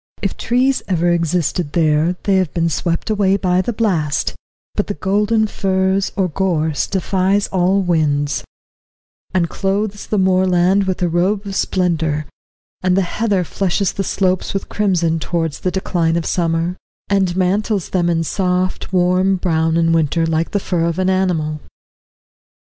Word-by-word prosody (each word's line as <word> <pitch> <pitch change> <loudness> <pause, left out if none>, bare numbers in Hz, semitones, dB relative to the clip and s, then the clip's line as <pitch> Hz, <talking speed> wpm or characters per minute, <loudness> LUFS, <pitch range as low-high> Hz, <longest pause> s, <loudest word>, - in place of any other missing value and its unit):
If 195 - -1
trees 255 +3 +1
ever 175 -2 +1
existed 170 -2 0
there, 160 +1 +2
they 195 -2 +2
have 185 -6 0
been 170 -1 +1
swept 170 +6 -2
away 200 -2 +2
by 185 -1 +1
the 215 - -2
blast, 180 -10 0 0.4
but - - -1
the - - -3
golden 210 +6 +1
furze 190 -1 0
or 190 -2 +1
gorse 160 -4 0
defies 195 +1 +1
all 190 +1 +2
winds, 145 -4 0 0.9
and 180 -2 +1
clothes 200 +3 -2
the 210 - -1
moorland 185 0 +3
with 185 -1 -2
a - - +3
robe 185 +5 0
of 195 -1 -5
splendour, 160 -6 0 0.6
and 185 0 +2
the 195 - +3
heather 200 +1 0
flushes 195 +2 -1
the 195 - -2
slopes 185 0 -1
with 195 - -3
crimson 175 -6 +1
towards 165 -2 -2
the 185 - -1
decline 175 -3 0
of 170 -1 -1
summer, 170 0 0 0.3
and 190 -3 +1
mantles 195 +1 0
them 175 -2 +1
in 165 -1 +1
soft, 185 +1 -1
warm 185 +1 +2
brown 165 -3 0
in 165 0 +2
winter, 165 +1 +1
like 160 0 0
the 205 - 0
fur 175 -3 -1
of 170 0 -1
an 185 0 +1
animal. 160 -5 0
180 Hz, 155 wpm, -18 LUFS, 165-195 Hz, 0.9 s, moorland